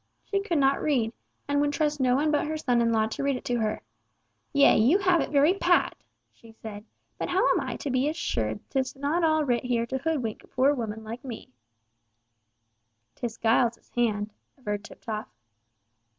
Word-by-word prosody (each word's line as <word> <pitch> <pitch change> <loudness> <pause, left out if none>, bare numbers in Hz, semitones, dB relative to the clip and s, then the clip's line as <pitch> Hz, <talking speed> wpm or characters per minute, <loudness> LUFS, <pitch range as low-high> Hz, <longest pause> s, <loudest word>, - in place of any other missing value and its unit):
She 400 - 0
could 360 -5 -1
not 275 -1 +3
read, 245 -7 +1 0.3
and 285 0 +2
would 290 0 +1
trust 300 -1 0
no 250 -1 +3
one 300 +3 +2
but 295 0 +1
her 310 0 -2
son 245 -5 +1
in 230 0 +2
law 220 -1 +3
to 220 - -4
read 275 -1 +1
it - - -7
to 245 -1 0
her. 215 -1 -1 0.7
"Yea, 280 -1 +6
you 250 - +5
have 370 -4 +3
it - - -2
very 290 +4 +4
pat," 360 -2 +2 0.4
she 230 - -17
said, 215 -1 -9 0.3
"but - - -2
how 370 +2 +3
am - - +2
I - - -4
to 280 - -4
be 260 +3 +2
assured 110 - -2
'tis 265 -1 -1
not 290 +5 0
all 315 -1 +3
writ 245 -3 +1
here 240 -2 0
to 265 +3 -3
hoodwink 270 -7 -2
a - - -18
poor 270 +3 +3
woman 220 -4 -4
like 225 +3 -7
me." 245 -5 -8 1.6
"'Tis 235 -2 -5
Giles's 230 +1 +1
hand," 215 -3 0 0.2
averred 210 -5 -4
Tiptoff. 220 -1 -6
255 Hz, 190 wpm, -27 LUFS, 225-295 Hz, 1.6 s, Yea